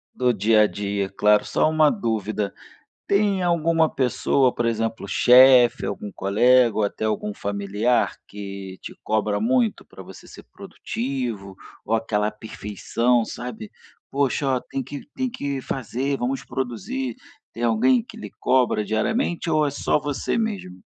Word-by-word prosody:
Do 125 Hz, -1 st, +2 dB
dia 105 Hz, +2 st, +4 dB
a -, -, +5 dB
dia, 100 Hz, -1 st, -3 dB
claro. 105 Hz, +1 st, +3 dB
Só -, -, +1 dB
uma 155 Hz, -1 st, +4 dB
dúvida: 110 Hz, -, -2 dB, 0.6 s
tem 200 Hz, -1 st, +2 dB
alguma 165 Hz, -2 st, +2 dB
pessoa, 130 Hz, 0 st, +1 dB
por 120 Hz, -, -2 dB
exemplo, 115 Hz, -2 st, -2 dB
chefe, 125 Hz, +3 st, +6 dB
algum 100 Hz, 0 st, -5 dB
colega, 120 Hz, +4 st, +3 dB
ou 110 Hz, -, +1 dB
até 105 Hz, +2 st, -2 dB
algum 105 Hz, -1 st, -2 dB
familiar 100 Hz, +4 st, 0 dB
que 100 Hz, -2 st, -8 dB
te -, -, -8 dB
cobra 105 Hz, -1 st, 0 dB
muito 120 Hz, 0 st, +1 dB
pra -, -, -12 dB
você -, -, -13 dB
ser -, -, -13 dB
produtivo? 115 Hz, -7 st, -5 dB, 0.3 s
Ou 115 Hz, -, +1 dB
aquela 105 Hz, -2 st, 0 dB
perfeição, 110 Hz, +3 st, -1 dB
sabe? 110 Hz, -3 st, -7 dB, 0.4 s
"Poxa, 140 Hz, 0 st, 0 dB
ó, -, -, -3 dB
tem 135 Hz, +1 st, -5 dB
que 140 Hz, +3 st, -8 dB
tem 260 Hz, -1 st, -1 dB
que 140 Hz, -, -4 dB
fazer, 135 Hz, +3 st, -3 dB
vamos 130 Hz, +2 st, -2 dB
produzir." 195 Hz, -, -4 dB, 0.4 s
Tem 115 Hz, -, -5 dB
alguém 120 Hz, +2 st, +3 dB
que -, -, -13 dB
lhe 105 Hz, -, -8 dB
cobra 125 Hz, -4 st, +2 dB
diariamente 170 Hz, -, -1 dB
ou 155 Hz, -1 st, +2 dB
é 140 Hz, -, -1 dB
só -, -, 0 dB
você 145 Hz, -, -2 dB
mesmo? 195 Hz, -, -3 dB
120 Hz, 150 wpm, -23 LUFS, 105-135 Hz, 0.6 s, chefe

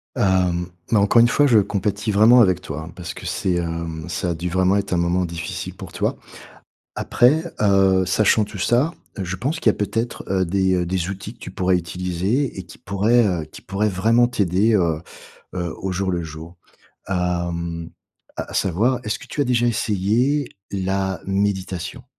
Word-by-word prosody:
Hem, 90 Hz, -2 st, +1 dB, 0.2 s
bah, 110 Hz, -, +5 dB
encore 105 Hz, +4 st, +5 dB
une 120 Hz, -, +6 dB
fois, 145 Hz, +4 st, +3 dB
je 115 Hz, -, +5 dB
compatis 100 Hz, +2 st, -1 dB
vraiment 115 Hz, +5 st, +7 dB
avec 90 Hz, -4 st, +3 dB
toi, 75 Hz, 0 st, -6 dB
hein, 80 Hz, +2 st, -9 dB
parce 90 Hz, -2 st, -6 dB
que -, -, -9 dB
c'est, 95 Hz, -, -1 dB
hem, 85 Hz, -2 st, -3 dB
ça 90 Hz, 0 st, -2 dB
a -, -, 0 dB
dû 90 Hz, +2 st, -4 dB
vraiment 95 Hz, +2 st, +2 dB
être 100 Hz, -2 st, -2 dB
un -, -, +2 dB
moment 85 Hz, +1 st, +1 dB
difficile 85 Hz, 0 st, -5 dB
pour -, -, -9 dB
toi. -, -, -1 dB, 0.8 s
Après, 150 Hz, +7 st, +3 dB, 0.2 s
heu, 95 Hz, -2 st, +4 dB
sachant 105 Hz, +3 st, +3 dB
tout 100 Hz, -, -8 dB
ça, 120 Hz, -, +2 dB, 0.3 s
je 95 Hz, 0 st, -3 dB
pense 145 Hz, -, -2 dB
qu'il -, -, 0 dB
y -, -, +1 dB
a -, -, -15 dB
peut-être, 115 Hz, +3 st, -2 dB
heu, 95 Hz, -1 st, +1 dB
des, 95 Hz, +1 st, +1 dB
heu, 90 Hz, -1 st, 0 dB
des 90 Hz, 0 st, -2 dB
outils 100 Hz, +3 st, -6 dB
que 120 Hz, -, -28 dB
tu -, -, -8 dB
pourrais 90 Hz, 0 st, +1 dB
utiliser 90 Hz, -, -2 dB
et -, -, -5 dB
qui 85 Hz, -, -14 dB
pourraient, 105 Hz, +5 st, +2 dB
heu, 90 Hz, -6 st, -1 dB
qui 75 Hz, -, -13 dB
pourraient 100 Hz, +3 st, -1 dB
vraiment 115 Hz, +6 st, +3 dB
t'aider, 105 Hz, -1 st, +1 dB
heu 85 Hz, -5 st, +1 dB, 0.5 s
heu, 85 Hz, -2 st, -3 dB
au 95 Hz, 0 st, -2 dB
jour 95 Hz, +1 st, -1 dB
le 85 Hz, -1 st, -1 dB
jour. 80 Hz, +2 st, -9 dB, 0.5 s
Hem, 85 Hz, -2 st, -2 dB, 0.5 s
à -, -, -5 dB
à -, -, -9 dB
savoir, 115 Hz, +8 st, +1 dB
est-ce 105 Hz, -, -2 dB
que -, -, -11 dB
tu -, -, -3 dB
as -, -, +3 dB
déjà 120 Hz, -2 st, +2 dB
essayé 115 Hz, +6 st, +1 dB, 0.2 s
la 95 Hz, -1 st, -1 dB
méditation? 95 Hz, +2 st, -2 dB
95 Hz, 190 wpm, -21 LUFS, 90-110 Hz, 0.8 s, vraiment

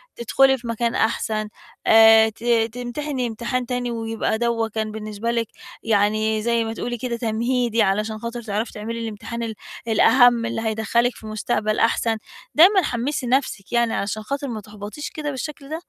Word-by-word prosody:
تدخُلي 265 Hz, +3 st, +3 dB
في 240 Hz, -1 st, -10 dB
مكان 230 Hz, +1 st, -1 dB
أحسن 215 Hz, -1 st, 0 dB, 0.4 s
آآ، 220 Hz, 0 st, +7 dB
ت 220 Hz, +1 st, -15 dB, 0.3 s
تمتحني 250 Hz, +2 st, -3 dB
امتحان 235 Hz, +2 st, -3 dB
تاني 245 Hz, 0 st, -2 dB
ويبقى 225 Hz, -1 st, -2 dB
دَوّا 235 Hz, -1 st, 0 dB
كان 220 Hz, 0 st, -3 dB
بالنسبة 215 Hz, +1 st, -4 dB
لِك 230 Hz, -1 st, -1 dB, 0.4 s
يعني 215 Hz, 0 st, +1 dB
زي 235 Hz, +1 st, +1 dB
ما 225 Hz, 0 st, -4 dB
تقولي 240 Hz, +1 st, -4 dB
كده 235 Hz, 0 st, -3 dB
تمهيدي، 235 Hz, +1 st, 0 dB
علشان 215 Hz, +2 st, 0 dB
خاطر 235 Hz, +1 st, -5 dB
تعرفي 220 Hz, +1 st, -3 dB
تعملي 225 Hz, +2 st, -5 dB
الامتحان 230 Hz, +1 st, -5 dB
ال 225 Hz, -1 st, -3 dB, 0.3 s
الأهَم، 240 Hz, +1 st, +5 dB
اللي 230 Hz, -1 st, -3 dB
هيدخّلِك 225 Hz, +2 st, 0 dB
في 220 Hz, -, -11 dB
مستقبل 215 Hz, 0 st, -1 dB
أحسن. 230 Hz, 0 st, +2 dB, 0.4 s
دايمًا 375 Hz, +5 st, +7 dB
حمّسي 250 Hz, 0 st, -2 dB
نَفْسك 250 Hz, -6 st, -1 dB
يعني 235 Hz, -1 st, +2 dB
علشان 215 Hz, +2 st, -2 dB
خاطر 280 Hz, +5 st, -3 dB
ما 225 Hz, -4 st, -5 dB
تحبطش 210 Hz, +7 st, -8 dB
كده 295 Hz, -2 st, -4 dB
بالشكل 280 Hz, +1 st, -6 dB
ده. 315 Hz, +1 st, -3 dB
230 Hz, 160 wpm, -22 LUFS, 220-245 Hz, 0.4 s, آآ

